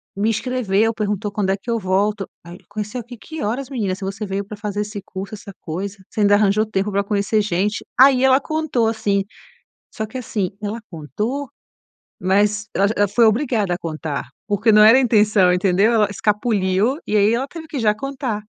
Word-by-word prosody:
me 210 +3 +1
escreveu, 225 -2 0
perguntou 210 -1 -2
quando 200 -2 -1
é - - +2
que 235 +4 -6
eu 230 - 0
volto." 195 +1 0 0.2
Aí 175 +1 -10
conheceu 215 +4 -4
aqui 240 +1 -11
que 315 +10 -8
horas 250 +6 -2
menina, 205 -8 -2
se 195 - -10
você 195 +2 -4
veio 195 0 -3
para 205 0 -9
fazer 205 -1 -3
esse 210 -1 -5
curso, 195 +2 -7
essa 200 -1 -11
coisa, 190 +5 -5
você 215 - -3
ainda 205 0 +5
arranjou 210 +1 +3
tempo 210 -1 -2
para 200 +1 +1
conhecer 205 +1 +1
gente, 205 +2 -1
aí 265 -1 +7
ela 265 +1 +5
contou 310 -8 0
assim, 200 -3 0 0.7
só 220 - -3
que 255 +5 -8
assim, 210 -6 -2
ela 210 +3 -3
contou, 220 - -4 0.7
mas, 205 +3 +1
ela 200 +1 +3
j 220 - -1
ela 205 0 +3
foi 230 +4 +3
obrigada 220 -5 +1
a - - -2
contar, 155 -5 -4 0.2
porque 215 +2 +2
não 210 0 +7
era 225 +4 +8
a 270 - +4
intenção, 210 -6 +4
entendeu, 190 +4 +3
ela 215 -3 +3
escapuliu 210 +2 +1
e 210 - +1
aí 205 +3 +4
ela 260 +3 -1
teve 320 +1 -9
que 290 -4 -4
já 210 -2 +2
contar. 260 -6 -4
210 Hz, 200 wpm, -20 LUFS, 200-230 Hz, 0.7 s, era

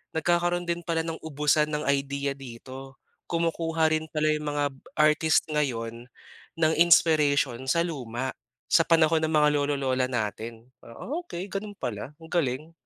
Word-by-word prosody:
nagkakaroon 175 +1 +1
din 170 0 -2
pala 165 -1 -1
ng 165 0 -4
ubusan 150 0 +1
ng 150 -1 -2
idea 140 0 0
dito. 135 +1 -10 0.3
Kumukuha 165 -1 +1
rin 155 0 -3
pala 155 -1 0
'yong 155 0 +1
mga 145 -1 -1 0.3
artist 155 +1 +4
ngayon 120 -6 -2 0.6
ng 160 0 +3
inspiration 150 -6 +4
sa 170 +6 +2
luma, 130 -6 -4 0.3
sa 165 - +5
panahon 165 -1 +3
ng 155 - 0
mga 150 -1 +4
lolo-lola 135 -3 0
natin. 115 0 -4 0.2
Ah, 115 - -13 0.2
okey 185 - -6
gano'n 205 +1 -5
pala, 120 +1 -4
ang 160 - -12
galing. 155 -1 -1
150 Hz, 145 wpm, -27 LUFS, 135-165 Hz, 0.6 s, sa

